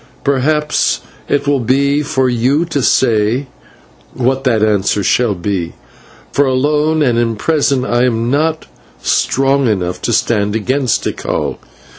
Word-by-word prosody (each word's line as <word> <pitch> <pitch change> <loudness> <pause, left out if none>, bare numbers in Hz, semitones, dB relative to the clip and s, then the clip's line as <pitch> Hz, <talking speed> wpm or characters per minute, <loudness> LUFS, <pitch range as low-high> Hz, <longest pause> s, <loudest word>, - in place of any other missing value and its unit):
Perhaps 150 +2 +1 0.3
it 145 - 0
will 140 -1 +1
be 140 +4 +1
for 135 -3 0
you 130 +6 +1
to 150 -4 -2
say 120 +1 +2 0.7
what 130 +2 0
the 125 - +3
answer 105 -2 +1
shall 115 +1 +1
be, 90 -2 -3 0.6
for 145 - +2
alone 150 +4 +1
and 120 -4 +2
in 115 -1 0
prison 140 +1 0
I 120 +1 +1
am 115 -1 0
not 155 +2 0 0.4
strong 135 0 +1
enough 90 -5 -2
to - - -1
stand 105 -2 +1
against 130 +3 0
Tikal. - - -3
130 Hz, 135 wpm, -15 LUFS, 115-140 Hz, 0.7 s, the